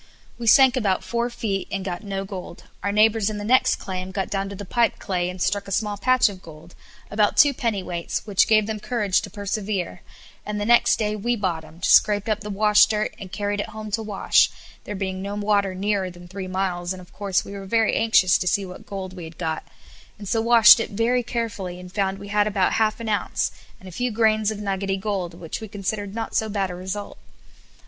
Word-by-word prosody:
We 235 - -4
sank 260 +2 +7
about 195 -7 0
four 235 +5 -1
feet 210 -5 -3
and 195 -1 -3
got 180 +1 -4
no 195 -1 -4
gold; 185 -3 -8 0.2
our 200 - -1
neighbours 215 0 +3
in 215 - -4
the 205 - -5
next 255 +5 +3
claim 185 -1 -5
got 190 +1 -3
down 195 -1 -1
to 200 - -7
the 205 - -7
pipe 235 +4 +1
clay, 180 -2 -2
and 180 0 -7
struck 200 +3 0
a - - -7
small 210 +1 0
patch 255 +5 +3
of 195 -3 -7
gold, 165 +1 -13 0.4
about 205 0 +2
two 290 -2 +6
pennyweights, 190 -9 -3
which 205 -3 +3
gave 215 -1 +4
them 215 0 -4
courage 205 -5 0
to - - -7
persevere, 200 - -3 0.4
and 210 0 -4
the 205 - -2
next 240 +2 +5
day 210 -1 -1
we 240 +4 -1
bottomed, 170 -4 -4
scraped 205 -1 +4
up 215 -1 +1
the 210 - -6
wash 210 +1 +5
dirt, 215 -1 -1
and 190 -2 -9
carried 205 0 -2
it 205 - -3
home 215 0 -8
to 225 +2 0
wash, 210 -3 +3 0.4
there 210 - -5
being 190 -1 -3
no 200 +1 -4
water 205 -2 +1
nearer 195 -1 -1
than 175 0 -13
three 190 +1 -6
miles, 185 -1 -2
and 185 - -9
of 180 - -15
course 200 -2 -1
we - - -9
were 195 -1 -7
very 225 +2 +2
anxious 220 -5 +4
to 180 - -2
see 195 +2 +1
what 180 0 -11
gold 190 -2 -6
we 175 -3 -7
had 160 0 -12
got, 160 -2 -3 0.5
and 205 -2 -9
so 225 +3 +1
washed 230 0 +8
it 225 - -2
very 230 +4 +1
carefully, 215 -7 -4
and 180 0 -11
found 195 -1 0
we 200 +1 -10
had 205 0 +2
about 195 -3 +1
half 215 0 +1
an 230 - -6
onnce, 205 -3 -1 0.3
and 190 - -13
a - - -9
few 245 +8 -1
grains 215 -1 +2
of 215 - -3
nuggety 195 -1 -2
gold; 190 -4 -3
which 170 +2 -6
we 220 - -6
considered 205 0 -4
not 225 -1 -4
so 220 - +1
bad 195 -3 -1
a - - -6
result. 190 +3 -6
200 Hz, 225 wpm, -23 LUFS, 185-215 Hz, 0.5 s, washed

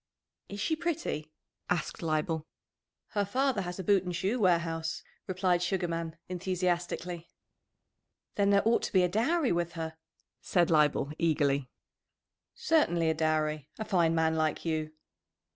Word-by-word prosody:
"Is 200 - -6
she 320 +10 +1
pretty?" 310 - -3 0.4
asked 175 -3 -1
Leibel. 155 -1 -1 0.6
"Her 205 - 0
father 250 +2 +1
has 180 -1 -5
a 190 - -4
boot 195 0 +3
and 180 -1 -4
shoe 195 +8 0
warehouse," 170 -4 +1 0.2
replied 185 -1 +1
Sugarman 170 -3 -2
enthusiastically. 180 -1 -2 1.0
"Then 200 -1 +2
there 200 +1 +4
ought 230 - +4
to - - -4
be 185 -2 +5
a - - +4
dowry 250 - +1
with 170 0 0
her," 160 -1 -5 0.4
said 175 -2 +2
Leibel 150 -2 +3
eagerly. 145 -5 +1 0.9
"Certainly 295 - +2
a - - +1
dowry! 155 -2 0
A 220 - -4
fine 170 -4 +2
man 160 0 +2
like 155 0 0
you!" 155 -1 -1
175 Hz, 140 wpm, -30 LUFS, 160-195 Hz, 1.0 s, be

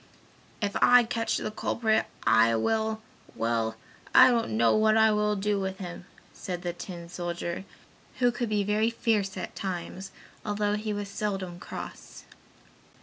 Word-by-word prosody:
"If 200 -1 -1
I 245 0 +7
catch 230 0 -1
the - - -3
culprit, 220 0 0 0.2
I 115 +1 +5
will 220 - 0 0.3
well, 115 -1 0 0.4
I 255 0 +9
don't 230 - 0
know 115 0 +4
what 215 0 +4
I 220 0 +5
will 210 0 +1
do 205 0 0
with 190 0 -3
him!" 175 -2 -7 0.3
said 180 -1 -6
the 175 -1 -2
tin 175 -1 -8
soldier, 175 +1 -4 0.5
who 245 -1 +3
could 240 -1 -3
be 210 -1 +1
very 210 +2 +2
fierce 210 -4 0
at 185 - -6
times, 190 0 -5 0.3
although 205 -1 0
he 210 +1 -2
was 205 -1 -3
seldom 195 -3 -4
cross. - - -9
205 Hz, 150 wpm, -28 LUFS, 175-220 Hz, 0.5 s, I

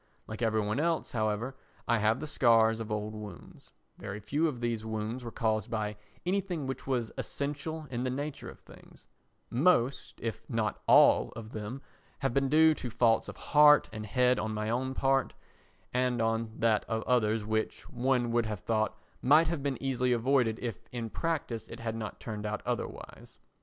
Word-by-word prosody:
Like 110 +1 -7
every 110 -1 +2
one 105 +5 -1
else, 165 +1 0
however, 110 +3 -1 0.3
I 120 -1 +3
have 110 +3 +2
the - - -4
scars 115 -6 +4
of 110 -1 -5
old 105 0 -2
wounds; 105 -1 -10 0.3
very 100 +2 -6
few 145 +10 0
of 135 -6 -4
these 120 -2 -1
wounds 110 +3 -4
were 120 - -5
caused 110 -3 -1
by 105 -2 -2 0.3
anything 180 -5 -1
which 135 0 -5
was 120 -4 -1
essential 150 +3 -4
in 120 0 -2
the 130 - 0
nature 145 +3 -4
of - - -13
things; - - -16 0.5
most, 135 -1 +2
if 115 -1 -4
not 110 -4 -1
all - - +6
of 110 -1 -8
them, 110 +6 -6 0.3
have 135 -3 -1
been 135 0 +2
due 160 +2 +6
to 125 - -5
faults 115 -1 +2
of - - -9
heart 150 0 +6
and 110 -1 -6
head 125 +4 +3
on 110 0 -2
my 105 +1 -2
own 130 +2 -1
part 135 -1 +1 0.6
and 125 -1 +1
on 115 0 0
that 110 -2 +2
of 110 0 -2
others 110 -3 +1
which, 110 0 -2
one 125 -1 0
would 115 -1 +1
have 105 -2 -4
thought, 110 0 0 0.2
might 155 +5 +5
have 165 -4 -2
been 140 -1 -1
easily 125 -2 +1
avoided 120 -2 +2
if 115 -6 -5
in 115 -3 -4
practice 150 -9 -2
it 115 - -9
had 115 -1 -3
not 110 -1 -6
turned 105 -2 -5
out 105 0 -3
otherwise. - - -5
120 Hz, 185 wpm, -30 LUFS, 110-135 Hz, 0.6 s, all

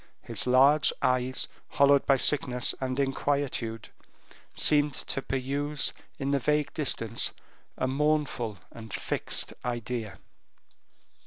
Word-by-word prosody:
His - - 0
large 135 +4 +5
eyes, 130 0 +1 0.2
hollowed 140 +1 +4
by 135 - +5
sickness 125 -3 +2
and 130 +1 -2
inquietude, 135 -4 -1 0.7
seemed 145 -2 +2
to 135 - -4
peruse 140 +3 -2 0.2
in 140 0 -2
the 140 - +2
vague 150 +2 0
distance 115 -7 -1 0.4
a - - 0
mournful 140 -6 0
and 110 -2 -10
fixed - - -2
idea. 120 -3 -4
135 Hz, 105 wpm, -28 LUFS, 125-145 Hz, 0.7 s, large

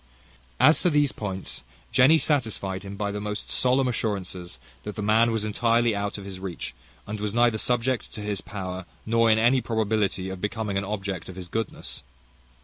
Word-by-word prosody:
As 140 +6 +6
to 180 - +4
these 145 -3 +3
points, 95 -3 -4 0.3
Jenny 140 +6 +6
satisfied 110 -11 0
him 100 +1 -7
by 100 0 -1
the 105 0 -4
most 105 0 -4
solemn 130 +1 +3
assurances, 95 -7 -3 0.2
that 105 - -6
the 105 - -3
man 110 +3 +4
was 110 -2 0
entirely 115 +1 +2
out 100 +1 -2
of 100 - -8
his 95 -2 -7
reach; 95 -9 -5 0.3
and 105 +1 -5
was 105 +1 -2
neither 120 -2 +4
subject 125 0 0
to 105 - -5
his 105 -2 -2
power, 95 -3 -6 0.2
nor 115 0 +3
in 110 - +5
any 120 +3 +4
probability 105 -5 0
of 95 -1 -6
becoming 105 -1 -2
an - - -4
object 95 -4 -4
of 95 - -8
his 90 -1 -7
goodness. 110 +4 -4
105 Hz, 185 wpm, -26 LUFS, 100-115 Hz, 0.3 s, As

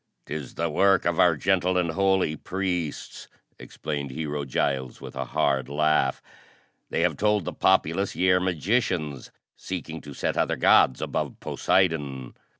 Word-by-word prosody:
"'Tis 75 -3 -6
the 85 - -1
work 95 +4 +3
of 85 -1 0
our 85 -2 +5
gentle 90 +2 +1
and 85 -2 +1
holy 95 -3 +1
priests," 90 -4 -4 0.3
explained 70 -2 -5
Hero 75 +1 -4
Giles 65 -1 -2
with - - -10
a 65 0 -3
hard 65 +1 0
laugh. 75 -2 +1 0.7
"They - - -1
have - - +1
told 105 -3 +1
the - - -4
populace 95 +5 +1
ye 95 0 +3
are 90 - +4
magicians 90 - -1 0.3
seeking 80 -3 -6
to 70 -2 -10
set - - -2
other - - +1
gods 65 - +4
above - - -3
Poseidon." 75 -9 0
80 Hz, 150 wpm, -25 LUFS, 70-95 Hz, 0.7 s, our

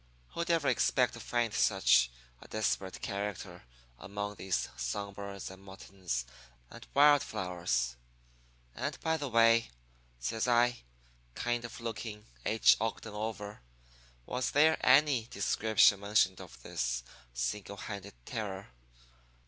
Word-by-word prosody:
Who'd 170 0 -4
ever 165 -4 +2
expect 125 -2 +2
to 115 - -9
find 120 -1 -1
such 95 - +4 0.3
a - - -13
desperate 100 -3 -2
character 100 -7 -4 0.3
among 100 +4 -4
these 95 -2 -2
song 65 +12 -3
birds 100 -1 -7
and 95 0 -13
muttons 95 -9 -5 0.5
and - - -12
wild 145 0 +7
flowers? 85 - -2 0.8
And, - - -4
by 160 0 +1
the 145 -3 -4
way,' 115 0 +4 0.5
says 110 - -1
I, 120 - +2 0.5
kind 120 0 -1
of 120 - -8
looking 110 -2 -6 0.2
H. 110 +1 +5
Ogden 110 -2 -3
over, 105 -1 -5 0.6
'was 125 - -1
there 155 +2 +4
any 135 -3 +5
description 110 -4 +3
mentioned 100 -2 +2
of - - -13
this - - -2 0.3
single 60 +12 -3
handed 100 -1 -7
terror? 100 -3 -5
105 Hz, 125 wpm, -32 LUFS, 95-120 Hz, 0.8 s, wild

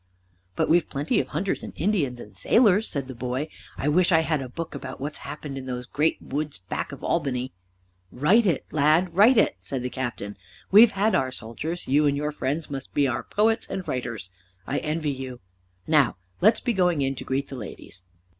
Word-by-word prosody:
"But - - +1
we've 170 -1 +3
plenty 145 +2 0
of 130 - -1
hunters 180 +8 -2
and - - -8
Indians 155 - 0
and 105 -2 -11
sailors," 220 -2 +4
said 140 -3 -3
the 130 - -6
boy; 130 +5 -3 0.3
"I 140 - -2
wish 175 +5 +4
I 160 -1 +5
had 155 -3 0
a 130 - -6
book 165 +6 -6
about 130 -1 -7
what's 145 +3 -4
happened 145 -2 -6
in 130 - -8
those 125 -1 -4
great 150 +5 0
woods 150 -1 -3
back 90 +1 -5
of - - -10
Albany." 130 -6 -1 0.6
"Write 195 - +4
it, 165 -7 0
lad, 155 +4 +3
write 220 +7 +6
it," 215 - +3
said 130 -3 -4
the 125 - -3
Captain. 120 -5 -4 0.3
"We've 215 +4 +9
had 210 +2 +1
our 130 -1 +1
soldiers, 130 +9 -5
you 145 +3 +4
and 140 0 +1
your 150 +1 -1
friends 150 +2 -2
must 135 -2 -7
be 140 -1 +3
our 130 - -1
poets 220 +2 +1
and 190 - -4
writers. 115 -7 -4 0.3
I - - -1
envy 155 -1 -1
you. 130 -2 -6 0.5
Now 150 - +3 0.2
let 215 +4 +7
us - - -7
be 240 - 0
going 180 -7 +2
in 135 0 0
to 135 - -7
greet 135 +1 -2
the 135 - -6
ladies." 105 -5 -9
145 Hz, 205 wpm, -25 LUFS, 130-170 Hz, 0.6 s, We've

